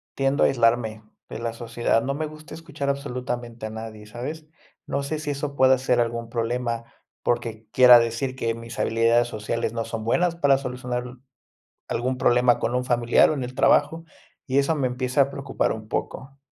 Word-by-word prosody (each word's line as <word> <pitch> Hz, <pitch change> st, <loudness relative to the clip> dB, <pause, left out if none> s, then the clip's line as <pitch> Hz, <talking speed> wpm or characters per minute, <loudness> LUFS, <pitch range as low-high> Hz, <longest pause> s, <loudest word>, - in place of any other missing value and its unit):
tiendo 135 Hz, +1 st, +1 dB
a -, -, +6 dB
aislarme 115 Hz, -3 st, +1 dB, 0.3 s
de -, -, -6 dB
la 115 Hz, -1 st, -3 dB
sociedad. 115 Hz, 0 st, 0 dB
No 140 Hz, +1 st, -2 dB
me 155 Hz, -, -2 dB
gusta 155 Hz, 0 st, -12 dB
escuchar 155 Hz, -4 st, -5 dB
absolutamente 125 Hz, -4 st, -4 dB
a -, -, -7 dB
nadie, 110 Hz, -1 st, -8 dB
¿sabes? 150 Hz, +8 st, -7 dB, 0.4 s
No 140 Hz, -, -2 dB
sé 150 Hz, +2 st, -3 dB
si 155 Hz, -, -5 dB
eso 140 Hz, 0 st, -4 dB
pueda 130 Hz, -1 st, +5 dB
ser 125 Hz, -1 st, +1 dB
algún 115 Hz, -1 st, -1 dB
problema, 115 Hz, 0 st, -2 dB, 0.4 s
porque 115 Hz, -2 st, -2 dB
quiera 125 Hz, -1 st, +8 dB
decir 115 Hz, +3 st, -2 dB
que 115 Hz, -3 st, -2 dB
mis 115 Hz, 0 st, -9 dB
habilidades 115 Hz, +1 st, +3 dB
sociales 115 Hz, 0 st, -3 dB
no 115 Hz, -1 st, -2 dB
son 110 Hz, -1 st, -5 dB
buenas 170 Hz, +9 st, +1 dB
para 145 Hz, -5 st, +3 dB
solucionar 125 Hz, -2 st, -4 dB, 0.8 s
algún 130 Hz, +2 st, -1 dB
problema 120 Hz, 0 st, +4 dB
con 115 Hz, -, -1 dB
un 125 Hz, 0 st, 0 dB
familiar 120 Hz, -1 st, +4 dB
o -, -, +1 dB
en 135 Hz, -, -3 dB
el 125 Hz, +1 st, -6 dB
trabajo, 165 Hz, +5 st, +3 dB, 0.4 s
y 130 Hz, 0 st, 0 dB
eso 140 Hz, +4 st, +2 dB
me 140 Hz, -4 st, 0 dB
empieza 125 Hz, +2 st, 0 dB
a 140 Hz, -, +2 dB
preocupar 140 Hz, 0 st, -1 dB
un 110 Hz, -1 st, -9 dB
poco. 135 Hz, +5 st, -5 dB
125 Hz, 185 wpm, -24 LUFS, 115-140 Hz, 0.8 s, quiera